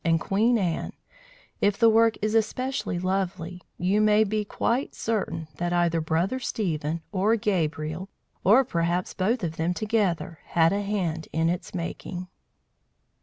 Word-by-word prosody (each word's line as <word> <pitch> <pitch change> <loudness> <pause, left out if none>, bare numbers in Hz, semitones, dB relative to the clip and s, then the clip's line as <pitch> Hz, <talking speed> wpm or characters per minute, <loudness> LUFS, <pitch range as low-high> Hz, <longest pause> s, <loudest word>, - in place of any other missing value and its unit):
and 165 -1 +3
Queen 220 +7 +2
Anne, 175 -6 -1 0.7
if 205 0 +3
the 230 - +5
work 225 0 +5
is 215 0 +1
especially 225 -3 0
lovely, 180 -1 -2 0.2
you 190 +4 +2
may 215 0 +5
be 215 0 -1
quite 235 +5 -1
certain 210 -7 -2
that 175 0 -1
either 170 -1 +2
Brother 165 +10 0
Stephen, 165 - -2
or 205 +3 +2
Gabriel, 165 -3 -1 0.3
or 225 +8 +6
perhaps 175 -3 -1
both 220 +4 0
of 160 -2 -3
them 170 +2 0
together, 200 -7 0
had 165 +1 +3
a 200 - 0
hand 180 -6 -2
in 160 +1 +1
its 175 +2 -4
making. 175 +1 -5
185 Hz, 145 wpm, -26 LUFS, 170-215 Hz, 0.7 s, or